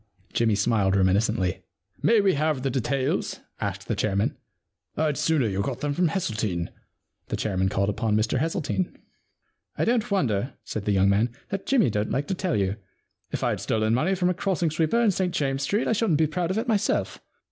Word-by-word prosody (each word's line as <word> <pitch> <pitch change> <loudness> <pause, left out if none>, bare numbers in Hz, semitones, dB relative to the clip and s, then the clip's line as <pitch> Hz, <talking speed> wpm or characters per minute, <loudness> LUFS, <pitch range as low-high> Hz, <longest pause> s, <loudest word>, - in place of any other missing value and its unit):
Jimmy 115 -3 +2
smiled 100 -2 +2
reminiscently. 95 0 +2 0.2
* - - -35
May 230 -2 +4
we 195 -2 +3
have 150 -2 0
the 135 - 0
details? 130 +1 -1
' - - -26
asked - - -3
the - - 0
chairman. 100 -1 0 0.3
* - - -47
rd 155 -2 +2
sooner 155 -5 +2
you 100 -1 -1
got 125 +4 -3
them 145 -1 0
from 175 +4 +2
Hesseltine.' 110 - -2 0.6
The - - -2
chairman 95 -2 0
called 100 +1 0
upon 105 +1 0
Mr 110 +4 +1
Hesseltine. 165 +3 -1 0.4
* - - -45
I - - +1
don't 235 0 +1
wonder,' 130 - 0
said 105 -2 -5
that 105 - +2
young 95 0 +4
man, 105 +5 +3
* - - -35
that 195 0 -4
Jimmy 240 - +3
don't 105 +1 -1
like 140 +2 0
to - - +1
tell 185 -3 -1
you. 100 +1 0 0.5
If - - -3
I'd - - 0
stolen 110 0 0
money 160 +11 +2
from 180 -1 +2
a - - 0
crossing 180 -3 0
sweeper 160 +8 +1
in 230 -3 +4
St 180 -1 -1
James's 135 -1 0
Street 205 +9 0
I - - +3
shouldn't 210 -8 +2
be 160 - +3
proud 165 +3 -2
of 190 - -1
it 225 +3 -1
myself. 215 -3 0
135 Hz, 210 wpm, -25 LUFS, -, 0.6 s, May